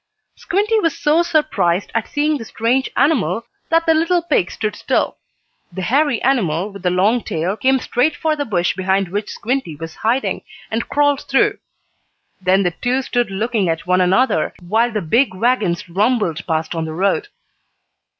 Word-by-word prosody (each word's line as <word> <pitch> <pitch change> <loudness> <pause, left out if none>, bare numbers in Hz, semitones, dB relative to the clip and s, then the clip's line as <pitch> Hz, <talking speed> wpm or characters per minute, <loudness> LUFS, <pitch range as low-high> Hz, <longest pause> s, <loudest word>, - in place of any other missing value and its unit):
Squinty 420 +3 0
was 330 -5 0
so 305 +3 +3
surprised 300 - 0
at 230 -1 -1
seeing 295 0 0
the 225 - -7
strange 240 +5 0
animal 270 -5 +1 0.2
that 330 0 +3
the 325 - +4
little 335 +2 +2
pig 295 - +1
stood 210 -1 -3
still. - - -1 0.5
The 185 +2 -5
hairy 275 +2 +2
animal, 200 - +1
with 200 -1 -10
the 180 - +1
long 200 +7 +2
tail, 170 +5 -2
came 265 +4 +2
straight 260 +4 0
for 315 -1 0
the 290 - -2
bush 180 -9 0
behind 190 0 0
which 205 +3 -3
Squinty 245 - -3
was 165 +2 -8
hiding, 240 +5 0 0.3
and 225 +1 -2
crawled 290 -1 +2
through. 405 +10 +2 0.8
Then 190 +2 +3
the 180 - +1
two 250 +8 -1
stood 245 -3 0
looking 210 -1 -1
at 165 0 -2
one 180 0 +2
another, 190 +9 +2
while 230 +5 +2
the 215 -4 -2
big 230 - +2
wagons 210 -6 0
rumbled 195 -3 0
past 160 -1 -1
on 165 -1 -2
the 160 - -5
road. 195 - 0
225 Hz, 170 wpm, -19 LUFS, 185-280 Hz, 0.8 s, the